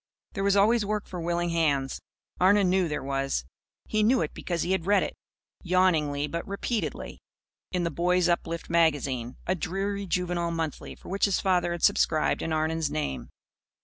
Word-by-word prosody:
There 195 - -2
was 200 0 +3
always 220 +3 +4
work 210 0 -2
for 180 -2 -6
willing 175 +1 -1
hands. 145 -5 0 0.4
Arnon 190 0 +4
knew 185 -2 +2
there 150 - -3
was. 135 - -1 0.4
He 215 - 0
knew 245 +4 +3
it - - -5
because 170 -2 -3
he 180 - -2
had 190 -2 0
read 205 0 +4
it - - -4 0.5
yawningly 165 -6 +2
but 170 +3 -5
repeatedly 205 +3 -3 0.5
in 180 -1 0
The 170 - -1
Boys' 180 +3 +2
Uplift 170 -1 -1
Magazine, 140 -7 +1
a 185 - +1
dreary 195 +3 -3
juvenile 175 -1 -1
monthly 165 -2 -4
for - - -13
which 195 +2 +2
his 200 -3 +1
father 180 -3 +1
had 170 -1 -4
subscribed 155 -2 +2
in 165 - -3
Arnon's 160 0 0
name. 70 - -3
175 Hz, 175 wpm, -27 LUFS, 160-190 Hz, 0.5 s, always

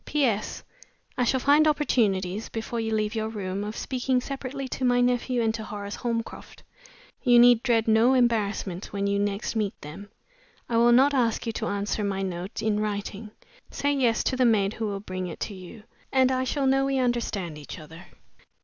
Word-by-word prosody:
"P.S. 250 -8 -1 0.5
I 250 - +1
shall 260 +2 +2
find 290 +4 +4
opportunities 215 -9 +1
(before 230 +1 -4
you 225 0 -2
leave 215 0 0
your 220 -1 -2
room) 200 -2 -4
of 210 +1 -5
speaking 255 0 0
separately 270 +1 -5
to 260 - -4
my 245 -1 +3
nephew 245 0 +1
and 220 -1 +1
to 220 -1 -5
Horace 205 -1 -6
Holmcroft. 230 -2 -5 0.6
You 245 -2 +5
need 240 -1 +7
dread 230 -3 +1
no 225 +4 +4
embarrassment, 210 -6 0
when 200 -1 -2
you 200 0 +1
next 205 +2 -2
meet 210 -3 -2
them. 180 +8 -9 0.6
I 230 - 0
will 235 +1 +5
not 270 +4 +5
ask 240 -4 +1
you 230 - -1
to - - -4
answer 205 +1 -2
my 195 -1 -1
note 185 +1 -5
in 215 -1 +1
writing. 210 0 -4 0.4
Say 285 0 -1
yes 245 -5 +1
to - - 0
the 255 - +2
maid 215 -4 +3
who 220 -1 -3
will 200 -1 -4
bring 185 -2 -5
it 170 - -8
to 210 - -3
you, 190 +3 -11 0.3
and 260 -1 +3
I 260 0 0
shall 280 +1 -1
know 270 0 +3
we 275 0 0
understand 230 -10 -1
each 145 - -9
other." 165 +2 -12
225 Hz, 195 wpm, -26 LUFS, 200-250 Hz, 0.6 s, need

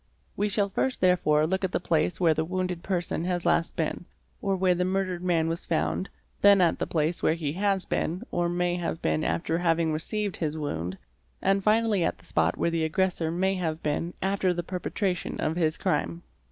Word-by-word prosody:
We 205 +1 0
shall 205 0 +1
first 255 +6 -1
therefore 165 -5 +3
look 190 +4 -1
at 185 - 0
the - - +1
place 170 0 0
where 165 -3 +4
the 155 +1 0
wounded 180 0 -2
person 175 -3 -2
has 180 -1 -1
last 170 -1 +2
been, 165 +2 -2 0.4
or 195 -1 +1
where 185 -1 +3
the 180 +1 0
murdered 185 -1 -1
man 170 -3 +2
was 165 +1 -3
found, 170 +3 0 0.3
then 200 -1 +7
at 175 -3 +3
the - - -1
place 160 +1 0
where 160 - +3
he 150 -4 -3
has 195 0 0
been 175 +3 -2
or 175 0 0
may 175 0 0
_ - - -4
have 165 -1 -3
been 80 0 +1
after 85 - 0
having 165 -2 +2
received 205 +6 -2
his 155 -2 -2
wound, 90 - -3 0.4
and 195 0 +1
finally 215 -3 +3
at - - 0
the - - -18
spot 80 +2 +1
where 170 - +1
the 165 -1 0
aggressor 170 0 0
may 190 +3 +1
have 165 -4 -3
been 155 +3 -2
after 190 -2 +1
the 175 - -2
perpetration 180 0 -2
of 155 - 0
his 160 -2 +1
crime. 175 -2 -1
175 Hz, 205 wpm, -27 LUFS, 160-190 Hz, 0.4 s, then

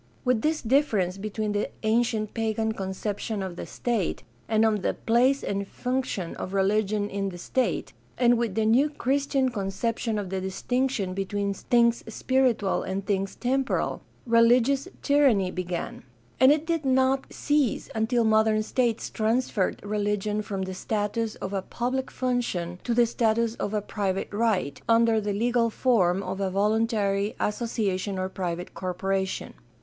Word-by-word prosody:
With 250 -3 +2
this 310 +3 0
difference 220 -8 +1
between 215 +1 -3
the 205 0 -1
ancient 220 -1 +1
pagan 220 0 0
conception 200 +1 -3
of 185 -2 -5
the - - -7
state 230 -7 -2 0.3
and 220 0 +3
of 215 -2 +2
the - - 0
place 255 +4 +2
and 200 0 -2
function 250 -9 -3
of 190 - -5
religion 205 +1 +1
in 200 -1 -2
the 175 - -8
state, 255 +8 -1 0.2
and 245 -1 +5
with 230 -4 -1
the 220 - +1
new 250 +7 +4
Christian 275 -1 0
conception 220 +2 -2
of 195 -3 -4
the 190 -1 -2
distinction 210 +1 -1
between 200 +1 -2
things 235 +2 +2
spiritual 245 -3 +1
and 190 +1 -4
things 195 -1 -1
temporal, 265 +2 -1 0.2
religious 240 +5 +4 0.2
tyranny 265 -11 +3
began; 180 -2 -4 0.4
and 260 +2 +7
it 300 +1 +2
did 330 -2 -1
not 265 0 +2
cease 290 -6 0
until 225 +2 +1
modern 220 0 +3
states 235 0 0
transferred 220 -3 0
religion 210 0 -1
from 195 -2 -4
the 190 0 -4
status 215 +3 -2
of 190 - -6
a 195 - 0
public 255 +6 -2
function 210 -9 -2
to 235 - 0
the 240 0 +5
status 230 0 +1
of - - -2
a 210 -2 -1
private 195 -2 -2
right, 205 -10 0
under 230 -1 +4
the 205 0 -2
legal 235 +2 +2
form 195 -6 +2
of 190 +1 -4
a 195 - +1
voluntary 205 0 +1
association 205 -3 -1
or 185 0 -2
private 180 -2 -4
corporation. 190 +1 -2
220 Hz, 150 wpm, -26 LUFS, 195-240 Hz, 0.4 s, and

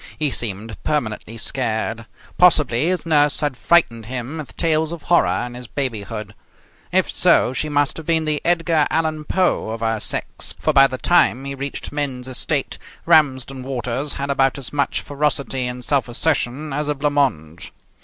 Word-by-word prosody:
He 150 -3 +1
seemed 110 -3 -4
permanently 115 -5 -2
scared. 115 -1 -3 0.3
Possibly 150 -6 +4
his 180 -1 -1
nurse 150 -2 +3
had 145 -3 -1
frightened 120 -8 +2
him 130 +5 -5
with 150 - -9
tales 160 -1 +1
of 170 -2 -7
horror 95 - +2
in 120 - -8
his 125 0 -9
babyhood. 110 -5 -4 0.6
If - - +1
so, 125 - +4
she 155 +3 -2
must 145 -1 +1
have 160 - -8
been 160 -1 +2
the 150 -1 0
Edgar 165 -3 +2
Allan 155 -1 -1
Poe 180 -9 +1
of 115 0 -5
her 115 -1 0
sex, - - -3
for, 155 - +1
by 135 -1 +7
the 130 - -5
time 135 -5 +2
he 140 - -4
reached 140 +1 -5
men's 135 -4 -3
estate, 130 - -1 0.3
Ramsden 135 -3 +3
Waters 130 +2 -3
had 140 0 -3
about 135 0 +2
as 135 -1 -6
much 145 -1 0
ferocity 140 -3 -1
and 125 0 -6
self 140 -5 +1
assertion 140 +2 -1
as 150 +1 -2
a 150 - 0
blanc 145 +1 0
mange. 85 - -1
135 Hz, 175 wpm, -21 LUFS, 120-150 Hz, 0.6 s, by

